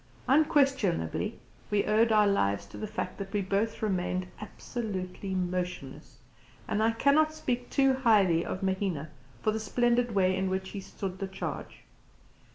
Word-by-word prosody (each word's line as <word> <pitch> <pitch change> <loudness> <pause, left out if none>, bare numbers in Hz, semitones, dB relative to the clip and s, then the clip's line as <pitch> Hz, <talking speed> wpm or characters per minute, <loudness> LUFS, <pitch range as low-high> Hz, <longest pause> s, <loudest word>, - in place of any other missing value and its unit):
Unquestionably 270 - +2 0.3
we 205 -1 +1
owed 225 +2 +3
our 210 -1 +5
lives 100 - +1
to 100 - -14
the 215 - -4
fact 210 - -4
that 195 -1 -5
we 210 - 0
both 205 +4 -1
remained 185 -2 0 0.2
absolutely 195 -4 -5
motionless; 180 -6 -4 0.5
and 210 - 0
I 220 - +4
cannot 305 +6 +3
speak 250 -4 -2
too 270 -1 +3
highly 205 -10 +4
of 185 - -4
Mahina 190 -6 -1 0.3
for 215 - +3
the 220 - -2
splendid 240 +2 +1
way 185 -1 +3
in 190 0 0
which 190 0 -2
he 200 - -6
stood 190 -1 -6
the 195 - -2
charge. 190 0 -6
200 Hz, 155 wpm, -29 LUFS, 185-230 Hz, 0.5 s, our